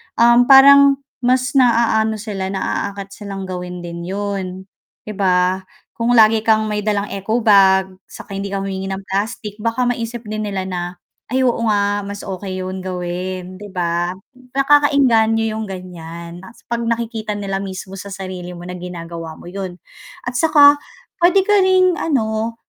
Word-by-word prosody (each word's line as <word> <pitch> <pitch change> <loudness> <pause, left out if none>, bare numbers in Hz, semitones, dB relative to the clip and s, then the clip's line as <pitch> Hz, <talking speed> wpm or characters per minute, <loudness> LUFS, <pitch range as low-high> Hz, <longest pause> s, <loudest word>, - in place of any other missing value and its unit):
um, 240 +1 +5
parang 280 +1 +8 0.2
mas 255 +1 +1
naaano 230 -4 +3
sila, 205 -3 -4
naaakit 195 0 -3
silang 195 -1 -7
gawin 180 -1 -6
din 170 0 -7
'yun 200 0 -3 0.6
'di 215 - -7
ba? 185 0 +1 0.3
Kung 235 +1 +2
lagi 220 -1 +6
kang 220 -1 +4
may 210 - -1
dalang 205 -1 -1
eco 215 +4 -2
bag, 190 -2 +5 0.2
saka - - -12
hindi 200 - -3
ka 195 0 -3
humihingi 195 -1 -4
ng 195 0 -5
plastic, 210 +2 -4
baka 230 +3 -1
maisip 240 -1 -2
din 215 -1 -4
nila 195 -2 -3
na, 185 -2 -4 0.5
"Ay 260 +2 0
oo 245 -2 +1
nga, 205 -1 +1
mas 205 0 -7
okey 185 -1 -5
yun 185 +1 -5
gawin" 185 0 -5
'di 205 - -8
ba? 175 -1 -1 0.4
Nakakaengganyo 275 -6 +4 0.2
yung 220 - -4
ganyan, 170 -2 -8
'tas 190 +6 -15
'pag 235 - 0
nakikita 225 -2 -2
nila 195 -1 -3
mismo 190 0 -7
sa 200 - -8
sarili 185 -2 -7
mo 175 - -10
na 180 0 -7
ginagawa 170 -2 -7
mo - - -15
'yun. 185 0 -6 0.5
At 245 0 -3
saka, 290 -2 +6 0.4
pwede 360 +3 +5
ka 415 +1 +3
ring 370 -2 +3
ano 225 -5 -1
200 Hz, 160 wpm, -19 LUFS, 185-230 Hz, 0.6 s, parang